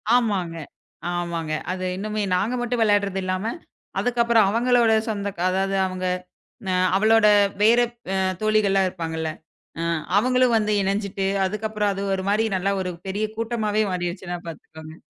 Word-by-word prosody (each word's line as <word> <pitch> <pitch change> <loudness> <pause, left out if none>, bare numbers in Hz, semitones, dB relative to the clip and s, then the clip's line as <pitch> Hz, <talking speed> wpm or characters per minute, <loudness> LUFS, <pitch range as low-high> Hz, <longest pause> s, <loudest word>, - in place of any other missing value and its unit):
ஆமாங்க, 195 -8 0 0.6
ஆமாங்க. 170 -2 -3 0.2
அது 185 0 -3
இன்னுமே 210 +1 -2
நாங்க 215 +7 0
மட்டும் 240 -1 -1
வெளாடுறது 200 -2 +2
இல்லாம 185 +5 -2 0.5
அதுக்கப்புறம் 235 -3 +3
அவங்களோட 235 0 +3 0.2
சொந்தக 200 -2 -3
க 170 - -5
அதாது 195 +1 0
அவங்க, 185 0 -4 0.9
அவளோட 220 +1 +5 0.3
வேற 230 +3 +6 0.6
தோழிகள்லா 215 -2 +3
இருப்பாங்கல. 160 -3 -4 0.5
அ, - - -1 0.3
அவங்களும் 250 +1 +3
வந்து 215 -1 0
இணஞ்சிட்டு 195 0 -1 0.2
அதுக்கப்புறம் 210 +1 -1
அது 195 +1 -4
ஒரு 190 - -4
மாரி 215 +2 +2
நல்லா 190 +2 0
ஒரு 185 -1 -3 0.2
பெரிய 205 +3 -1
கூட்டமாவே 220 -2 0
மாறிடுச்சுன்னா 175 0 -3
பாத்துக்கோங்க. 160 0 -10
200 Hz, 125 wpm, -23 LUFS, 185-220 Hz, 0.9 s, வேற